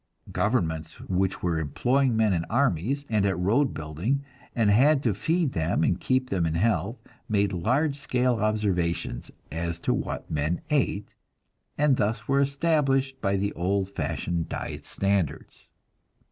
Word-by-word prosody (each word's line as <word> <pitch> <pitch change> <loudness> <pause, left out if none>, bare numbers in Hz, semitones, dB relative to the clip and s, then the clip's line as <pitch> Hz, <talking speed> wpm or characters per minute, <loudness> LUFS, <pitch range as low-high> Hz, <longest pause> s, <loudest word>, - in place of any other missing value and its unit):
Governments 80 -8 -1
which 95 0 -1
were 85 -2 +1
employing 125 - +1
men 110 -3 +3
in 85 -2 0
armies, 135 - 0
and 105 -3 +1
at 100 -1 +1
road 115 +10 +2
building, 85 - -2 0.3
and 110 -4 +3
had 135 +6 +4
to 115 - +2
feed 160 - 0
them 80 0 0
and 85 - +1
keep 130 0 0
them 90 -4 +1
in 80 - -1
health, 100 +3 +1 0.3
made 100 -2 +2
large 140 - +1
scale 125 -3 +1
observations 100 - -1 0.2
as 85 +1 -3
to - - +1
what - - -3
the - - -7
men 75 +3 0
ate, 130 -8 +1 0.7
and 145 -3 +3
thus 110 +1 -1
were 135 0 +3
established 140 -2 +1
the 100 0 0
old 95 +2 0
fashioned 85 -3 -2
"diet - - -5
standards." 100 -5 -2
105 Hz, 145 wpm, -26 LUFS, 85-130 Hz, 0.7 s, had